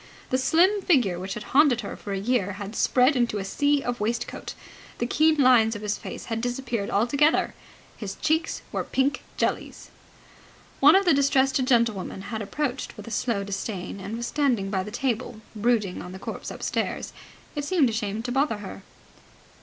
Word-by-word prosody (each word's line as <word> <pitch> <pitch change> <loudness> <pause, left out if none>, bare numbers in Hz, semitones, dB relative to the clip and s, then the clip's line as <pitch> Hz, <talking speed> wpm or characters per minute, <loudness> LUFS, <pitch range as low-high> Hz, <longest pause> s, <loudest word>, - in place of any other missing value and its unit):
The 255 - +2
slim 365 +9 +3
figure 245 - +2
which 190 +1 -5
had 215 - -6
haunted 275 -4 +5
her 200 - -6
for 205 - -8
a 195 - -1
year 205 -2 0
had 200 +2 -7
spread 255 +5 +3
into 240 -4 +1
a 195 - -3
sea 285 +7 +1
of 245 0 -3
waistcoat. 230 +3 -3 0.4
The 240 - -1
keen 310 +5 +3
lines 245 -5 +5
of 210 - -7
his 210 0 0
face - - -8
had 225 0 -3
disappeared 240 -4 -2
altogether. 280 +9 +2 0.4
His 195 -3 -5
cheeks 320 +1 0
were - - -1
pink 270 +2 0 0.2
jellies. - - -2 0.9
One 295 +5 +7
of 390 +1 +4
the 340 - +5
distressed 270 0 +3
gentlewomen 230 -7 +1
had 220 - -2
approached 255 +5 -3
with - - -10
a - - -7
slow 225 -4 -1
disdain, 195 -1 -5
and 200 +4 -5
was 235 - -3
standing 240 -9 0
by 190 -2 0
the 200 - -6
table, 235 -1 -2 0.2
brooding 210 -4 0
on 180 +1 -8
the - - -7
corpse - - -6
upstairs. - - -3 0.4
It 290 - -2
seemed 290 -5 +2
a - - -6
shame 215 0 -2
to 245 - -3
bother 270 -3 +1
her. 200 -1 -8
235 Hz, 185 wpm, -25 LUFS, 205-275 Hz, 0.9 s, One